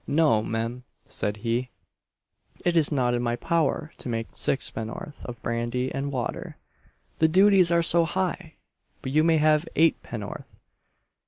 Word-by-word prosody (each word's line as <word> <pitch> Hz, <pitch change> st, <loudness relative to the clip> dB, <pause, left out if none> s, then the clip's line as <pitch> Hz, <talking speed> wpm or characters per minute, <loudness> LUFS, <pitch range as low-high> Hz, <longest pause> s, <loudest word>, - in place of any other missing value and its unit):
'No, 145 Hz, -8 st, +3 dB
mem,' 115 Hz, +3 st, -3 dB, 0.2 s
said 105 Hz, 0 st, -2 dB
he, 120 Hz, +2 st, -1 dB, 1.0 s
'it 175 Hz, -1 st, +2 dB
is 160 Hz, -3 st, +3 dB
not 125 Hz, -4 st, +1 dB
in 120 Hz, -, 0 dB
my 120 Hz, -1 st, 0 dB
power 160 Hz, +2 st, -1 dB
to -, -, -5 dB
make 115 Hz, -1 st, -3 dB
sixpenn'orth 120 Hz, +2 st, -3 dB
of 120 Hz, -2 st, -7 dB
brandy 120 Hz, +2 st, -2 dB
and 140 Hz, +1 st, -3 dB
water 125 Hz, -3 st, -4 dB, 0.6 s
the 160 Hz, -, +5 dB
dooties 190 Hz, 0 st, +5 dB
are 170 Hz, 0 st, +3 dB
so 170 Hz, 0 st, +5 dB
high; 180 Hz, -1 st, -3 dB, 0.5 s
but 130 Hz, -, -4 dB
you 155 Hz, +2 st, +3 dB
may 165 Hz, -1 st, +4 dB
have 155 Hz, +1 st, +3 dB
eightpenn'orth. 120 Hz, -9 st, -1 dB
140 Hz, 145 wpm, -25 LUFS, 120-165 Hz, 1.0 s, the